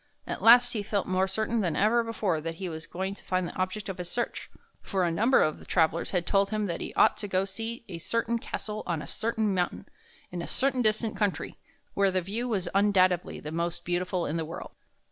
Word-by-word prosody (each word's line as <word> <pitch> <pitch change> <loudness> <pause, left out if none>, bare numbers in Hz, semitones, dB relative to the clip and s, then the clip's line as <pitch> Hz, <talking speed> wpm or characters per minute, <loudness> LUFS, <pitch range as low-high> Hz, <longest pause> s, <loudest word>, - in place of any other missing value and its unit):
At - - -4
last 245 +2 +7
he 215 - -1
felt 205 -1 -1
more 185 +1 +1
certain 220 +4 0
than 175 -5 0
ever 230 +3 +3
before 205 -8 -1
that 165 +1 -4
he 185 +2 -5
was 160 -1 -6
going 190 +2 -3
to - - -14
find 185 -1 0
the - - -8
object 185 +2 -2
of 190 -2 -5
his 175 -1 -4
search, 240 +4 -3 0.3
for 190 -3 -1
a 170 - +2
number 225 +10 +4
of 155 - -2
travelers 165 -1 +2
had 180 -3 0
told 195 0 +3
him 215 0 -1
that 170 -4 -3
he - - -4
ought - - +5
to 205 - -5
go 185 -1 +1
to - - -3
see 225 +4 -5
a 175 -4 -6
certain 230 +5 0
castle 215 -1 -5
on 165 -4 -1
a - - -9
certain 220 -2 0
mountain, 180 -1 -1 0.5
in 175 -1 -4
a - - -5
certain 265 -1 +1
distant 215 0 +1
country, 205 -3 -1 0.3
where 200 -1 +3
the 185 0 +1
view 210 +7 -3
was 195 -6 -1
undoubtedly 185 -3 +3
the 150 - -7
most 170 +1 -2
beautiful 180 0 -1
in 155 - -2
the 160 - -2
world. 165 +2 -7
195 Hz, 230 wpm, -28 LUFS, 175-220 Hz, 0.5 s, last